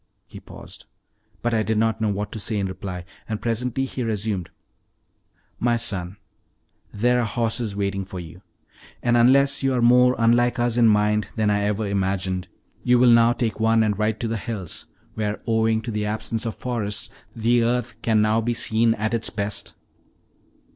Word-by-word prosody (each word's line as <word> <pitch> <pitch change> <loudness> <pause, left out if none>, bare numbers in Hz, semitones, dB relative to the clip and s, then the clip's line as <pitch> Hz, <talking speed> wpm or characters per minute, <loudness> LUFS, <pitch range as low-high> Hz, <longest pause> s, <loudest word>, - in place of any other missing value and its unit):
He - - -11
paused, - - -12 0.6
but 120 0 0
I 110 - +2
did 110 0 0
not 110 0 +1
know 110 - +2
what 105 +1 -3
to 110 - -5
say 105 +1 -1
in 100 - 0
reply, 90 -1 -6 0.2
and 110 -1 -2
presently 125 +3 -1
he 130 - -5
resumed: 105 -5 -2 1.1
"My 120 0 +2
son, 95 -5 -4 0.7
there 125 +4 +2
are 120 - +1
horses 115 -1 -1
waiting 100 -1 -2
for 95 -1 -8
you, 85 +1 -10 0.6
and 120 -1 +3
unless 135 +4 +4
you 135 -1 +1
are 125 - +1
more 125 +1 +5
unlike 120 +2 +3
us 120 -1 0
in 120 -1 +5
mind 105 0 +2
than 110 -2 +1
I 105 0 +1
ever 105 +1 -1
imagined, 95 -2 -1 0.4
you 125 0 +4
will 125 0 +6
now 115 0 +5
take 115 -4 -2
one 115 0 +3
and 105 -1 +1
ride 110 +1 -1
to 115 - -1
the 115 0 -2
hills, 100 -5 -5 0.3
where, 105 -1 -2
owing 110 -1 +1
to 115 - -4
the 105 -1 -2
absence 110 +2 -3
of 110 - -4
forests, 105 -5 -2 0.2
the 120 +1 +2
earth 120 0 -1
can 110 -2 +2
now 110 +1 +2
be 120 +1 -1
seen 115 0 +2
at 110 +2 -2
its 115 -1 -1
best." 100 0 -5
110 Hz, 180 wpm, -23 LUFS, 105-120 Hz, 1.1 s, will